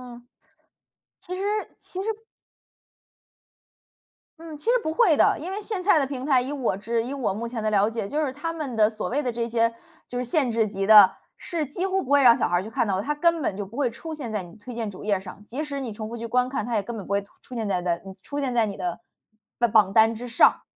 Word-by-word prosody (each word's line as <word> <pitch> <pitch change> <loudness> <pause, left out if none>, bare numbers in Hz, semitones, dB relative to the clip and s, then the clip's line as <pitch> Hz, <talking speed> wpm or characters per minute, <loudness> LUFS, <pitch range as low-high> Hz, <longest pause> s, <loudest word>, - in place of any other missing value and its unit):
嗯， 240 0 -16 0.9
其 365 - -6
实 385 - -4 0.4
其 370 - -7
实 430 - -4 2.3
嗯， 320 -2 -9
其 - - -14
实 470 - +4
不 315 - -1
会 395 -9 +4
的， - - +4
因 340 +5 -5
为 410 +2 -4
现 405 -3 -4
在 365 -3 +4
的 275 - +2
平 265 -1 -5
台， 265 -4 +4
以 260 - -4
我 270 -9 -1
之 230 +3 -1
以 255 - -5
我 250 -8 -1
目 230 +3 -4
前 230 -2 -5
的 215 - +1
了 205 +1 +3
解， 225 -3 -4
就 300 +6 -1
是 265 - -3
它 315 +4 -4
们 305 -7 -5
的 215 -1 +4
所 215 -1 -4
谓 285 +4 0
的 245 - -1
这 230 0 -2
些 230 0 +1 0.3
就 245 - -5
是 250 - -1
限 255 0 +1
制 225 -1 +2
级 195 -1 -3
的， 210 -2 +9 0.2
是 330 -3 -3
几 350 +7 -3
乎 385 0 0
不 270 - -7
会 285 -1 +6
让 240 -1 +7
小 - - 0
孩 175 - +2
儿 180 - -1
去 220 - -7
看 225 - 0
到。 190 -2 0
它 295 +8 -2
根 335 +1 +2
本 195 - -1
就 205 - -4
不 215 +6 -12
会 280 -4 +2
出 315 +8 -8
现 265 -8 -6
在 200 -3 -2
你 170 - -13
推 230 +3 -9
荐 225 -3 -3
主 185 - -11
页 205 - +2
儿 185 - -3
上， 195 +2 -11
即 265 +8 -4
使 280 -2 -4
你 250 -4 -4
重 215 0 -6
复 235 - -6
去 230 - -5
观 250 +2 +1
看， 260 -6 -2
它 240 -1 -2
也 205 - +1
根 235 +2 -6
本 200 - -7
不 - - -9
会 200 - +2
吐 200 - -19
出 250 - -11
现 220 -3 -2
在 180 -2 0
的 175 -1 0
嗯， 190 - -9
出 285 - -4
现 265 -3 -1
在 230 -2 +3
你 200 -2 -5
的 175 -2 -3 0.6
吧 240 - +3
榜 205 -3 +4
单 225 0 +5
之 245 +3 -7
上。 235 - +4
235 Hz, 295 characters per minute, -25 LUFS, 215-290 Hz, 2.3 s, 的